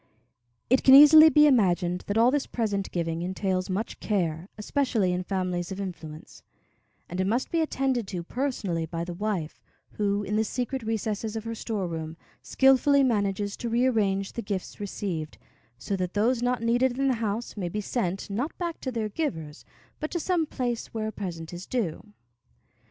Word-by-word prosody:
It 260 +2 +3
can 265 - +9
easily 310 +2 +10
be 300 -1 +6
imagined 180 -9 +2
that 205 - -1
all 235 +2 +5
this 285 -1 0
present 205 -4 -2
giving 165 -1 -2
entails 185 +1 -2
much 200 +5 -3
care, 175 -3 -1
especially 220 -4 0
in 180 - -1
families 180 -2 -2
of 190 - -5
influence; 165 -5 -8 0.7
and 180 +2 -3
it 190 - 0
must 235 +5 0
be 330 - +2
attended 265 -7 0
to 180 -3 -4
personally 200 -8 -2
by 165 +1 -4
the 175 0 -5
wife, 185 -4 -3 0.3
who, 205 0 -1
in 210 +1 -1
the 220 - +3
secret 250 +4 -3
recesses 220 -1 -3
of 220 - -4
her 230 0 -4
storeroom, 170 -8 -4 0.2
skillfully 270 +1 +4
manages 205 -4 0
to 235 - -4
rearrange 220 -5 +1
the 235 - -4
gifts 200 -4 -5
received, 185 -6 -4 0.4
so 195 +10 -3
that 185 0 -3
those 230 +4 +2
not 245 -1 0
needed 245 +2 +2
in 275 0 +1
the 265 - +3
house 220 +2 -3
may 185 -4 -3
be 210 - -3
sent, 195 -3 -2
not 240 +10 -3
back 340 -2 -4
to 260 - -3
their 225 -3 -2
givers, 165 - -4 0.3
but 305 - -3
to 345 - -2
some 335 -2 0
place 245 -4 -3
where 220 -1 -3
a - - -6
present 175 -5 -6
is 175 +1 -8
due. 215 -3 -3
210 Hz, 180 wpm, -27 LUFS, 185-245 Hz, 0.7 s, easily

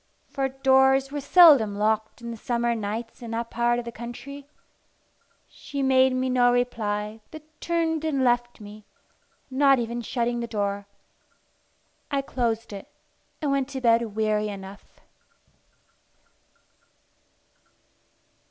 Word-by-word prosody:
For 270 -1 -1
doors 265 0 +3
were 290 0 -4
seldom 280 - +6
locked 220 +2 -1
in 235 - -5
the - - -6
summer 235 0 -1
nights 225 +2 -5
in 235 - -7
that 230 +1 -4
part 240 +1 +1
of 240 - -4
the 235 - -6
country. 270 +5 -9 1.0
She 280 -2 -6
made 260 0 +4
me 255 0 0
no 250 -1 +3
reply, 220 -3 -2
but 315 -1 -11 0.2
turned 325 -2 -1
and 285 -4 0
left 240 -1 +1
me, 210 0 -11 0.7
not 275 0 +4
even 235 0 -3
shutting 240 +1 -2
the 235 - -4
door. 200 -2 -3 1.2
I 280 -1 -1
closed 230 -5 -2
it, 195 - -10 0.5
and 290 - +1
went 275 -1 0
to 270 -2 -6
bed 230 -3 +2
weary 215 -1 0
enough. 200 0 -10
240 Hz, 125 wpm, -25 LUFS, 220-270 Hz, 1.2 s, seldom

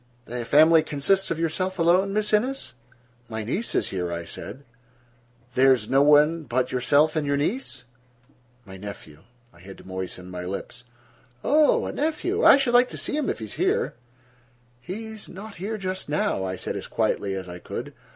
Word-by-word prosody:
"The 120 0 -4
family 160 +5 +6
consists 170 +7 0
of 165 - -2
yourself 185 +3 -1
alone, 180 +3 +3
Miss 210 +1 -1
Innes?" 235 - 0 0.6
"My 110 -1 -4
niece 185 - -3
is - - +1
here," 90 -2 -3
I 85 0 -4
said. 125 +10 -8 0.9
"There 135 +2 +5
is 120 -5 +1
no 135 +1 +5
one 150 +3 +5
but 130 -3 -1
yourself 145 +5 +3
and 155 -2 0
your 140 0 +1
niece?" 145 - -2 0.8
"My 95 -1 -10
nephew." 95 -6 -9 0.3
I 85 - -19
had 95 +2 -11
to - - -14
moisten 95 -1 -6
my 90 0 -5
lips. 100 +6 -6 0.6
"Oh, 300 +1 +4
a - - -3
nephew. 340 - -1
I - - +9
should 265 -3 0
like 245 +1 +5
to - - -7
see - - -2
him, 300 -2 -1
if - - -2
he 110 - -6
is 105 - -8
here." - - 0 0.9
"He 190 - -6
is 220 -1 -9
not 200 +2 -10
here 210 +5 -4
just 185 -4 -4
now," 145 -10 0
I 95 0 -3
said - - -4
as - - -5
quietly 100 -1 -1
as 95 -1 -5
I 90 0 -8
could. - - -6
150 Hz, 190 wpm, -25 LUFS, -, 0.9 s, I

